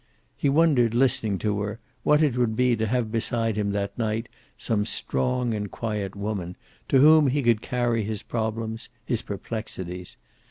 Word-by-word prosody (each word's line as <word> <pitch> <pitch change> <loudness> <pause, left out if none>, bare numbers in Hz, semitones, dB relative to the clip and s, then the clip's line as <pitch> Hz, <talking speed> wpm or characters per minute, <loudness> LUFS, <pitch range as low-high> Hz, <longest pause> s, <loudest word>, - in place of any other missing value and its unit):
He 140 - +1
wondered 135 -7 +3
listening 115 -5 +2
to 105 -1 0
her, 105 +2 -4 0.2
what 150 +1 +4
it 140 -6 +2
would 120 -3 +1
be 125 0 +3
to 110 0 -1
have 115 -1 0
beside 115 -1 0
him 105 -1 0
that 100 -1 -2
night 115 +1 -1 0.3
some 110 -3 0
strong 120 - -1
and 105 -1 -3
quiet 105 -3 -3
woman, 100 -3 -4 0.3
to - - +5
whom 155 +2 +7
he 140 +2 +1
could 115 -2 +3
carry 120 -3 0
his 105 -1 -4
problems, 110 0 -3 0.2
his 120 -2 -1
perplexities. 95 -4 -6
115 Hz, 165 wpm, -25 LUFS, 105-125 Hz, 0.3 s, whom